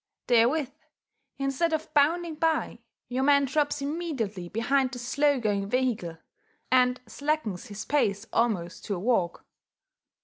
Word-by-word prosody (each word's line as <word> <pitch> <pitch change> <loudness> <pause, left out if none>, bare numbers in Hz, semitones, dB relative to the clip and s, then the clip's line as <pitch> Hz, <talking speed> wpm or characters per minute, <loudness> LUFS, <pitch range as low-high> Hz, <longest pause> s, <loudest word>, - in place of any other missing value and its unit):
Therewith, 250 +4 +3 0.7
instead 275 +5 0
of 315 0 -3
bounding 325 +3 +2
by, 320 0 0 0.3
your 255 +1 -2
man 280 0 +4
drops 290 +1 0
immediately 270 - -3
behind 255 +5 +1
the 255 - -6
slow 280 +3 +1
going 200 -3 -1
vehicle, 230 -10 -1 0.5
and 250 0 +4
slackens 230 - -2
his 210 +1 -7
pace 210 -8 +1
almost 195 -7 0
to 200 - -2
a - - -4
walk. 190 -5 0
255 Hz, 130 wpm, -27 LUFS, 215-290 Hz, 0.7 s, man